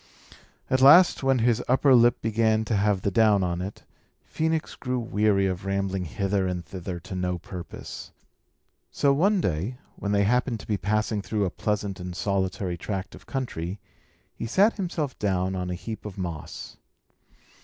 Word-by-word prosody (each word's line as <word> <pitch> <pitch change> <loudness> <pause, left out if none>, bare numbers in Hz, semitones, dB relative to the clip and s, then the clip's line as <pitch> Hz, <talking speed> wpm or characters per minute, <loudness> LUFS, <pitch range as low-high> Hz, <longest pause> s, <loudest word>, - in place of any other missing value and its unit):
At 130 0 +1
last, 170 +7 +7
when 135 -1 +3
his 120 -1 +2
upper 130 +2 +4
lip 120 -1 +4
began 110 0 +2
to 110 - 0
have 100 -1 +1
the 100 - +1
down 105 -1 +4
on 90 -1 -1
it, 95 +3 -7 0.4
Phœnix 160 0 -1
grew 125 -1 -2
weary 105 -4 +1
of 95 -1 -2
rambling 100 -1 -1
hither 95 +3 -1
and 90 -2 -3
thither 90 -1 -6
to 90 +2 -9
no 90 -1 -1
purpose. 90 0 -8 0.8
So, 140 -1 +2
one 195 +8 +3
day, 95 - -2 0.2
when 100 - -3
they 100 0 +3
happened 120 +2 +1
to - - -12
be 105 - 0
passing 110 +1 0
through 105 0 -1
a 90 - -2
pleasant 105 -2 -2
and 90 0 -6
solitary 95 0 -1
tract 95 +2 -4
of 95 +1 -14
country, 100 -8 -4 0.5
he 115 - -5
sat 200 - +4
himself 170 -8 -3
down 95 -2 0
on 90 -1 -3
a 90 - -2
heap 110 +5 -7
of 105 -3 -8
moss. 85 -5 -6
100 Hz, 170 wpm, -26 LUFS, 95-120 Hz, 0.8 s, last